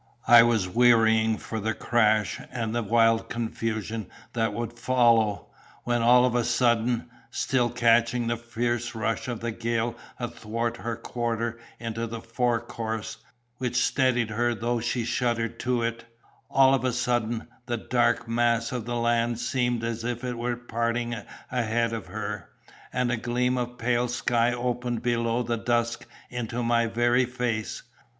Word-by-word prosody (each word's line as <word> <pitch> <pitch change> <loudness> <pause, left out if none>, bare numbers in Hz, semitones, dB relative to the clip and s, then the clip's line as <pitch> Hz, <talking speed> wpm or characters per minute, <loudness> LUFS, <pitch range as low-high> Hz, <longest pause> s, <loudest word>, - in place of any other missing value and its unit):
I 120 0 +10
was 115 -5 +2
wearying 110 0 +4
for 110 - -5
the 110 +1 -1
crash 110 -6 +2
and 115 -3 -3
the 120 - 0
wild 115 +1 +3
confusion 110 -2 -3 0.3
that 115 -2 +1
would 115 +2 -4
follow, 120 -3 +2 0.3
when 120 -1 0
all 125 +2 +6
of 125 - +1
a 120 -1 +2
sudden, 120 0 +1 0.2
still 125 -3 +1
catching 120 0 +3
the 120 0 0
fierce 120 0 -2
rush 115 +1 -2
of 120 -3 -4
the 120 0 -2
gale 115 +1 -1 0.2
athwart 115 -1 -3
her 115 0 -3
quarter 115 0 -3 0.2
into 115 0 -3
the 115 0 -6
fore 115 +1 0
course, 110 -2 -5 0.4
which 125 -1 -2
steadied 125 -2 +2
her 120 +2 +1
though 120 +2 -1
she 120 0 -1
shuddered 115 -1 -1
to 125 -1 0
it—all 115 +3 0
of 135 -2 +1
a 130 -1 +1
sudden, 120 -2 0 0.2
the 120 -1 -1
dark 120 0 +1
mass 115 0 +1
of 125 -3 -3
the 120 0 -3
land 120 0 +1
seemed 120 -1 0
as 115 0 -3
if 120 +1 -3
it 125 -1 -2
were 120 0 -2
parting 120 0 -2 0.4
ahead 115 -1 0
of 110 -5 -5
her, 105 -1 -5 0.4
and 125 -1 0
a 120 - 0
gleam 125 +2 0
of 125 -1 -3
pale 120 +1 +1
sky 120 0 +1
opened 120 -1 -2
below 120 0 +1
the 120 -1 -1
dusk 120 0 -1 0.2
into 120 0 -3
my 115 0 +2
very 120 +2 +2
face. 120 -3 -3
120 Hz, 155 wpm, -26 LUFS, 115-120 Hz, 0.4 s, I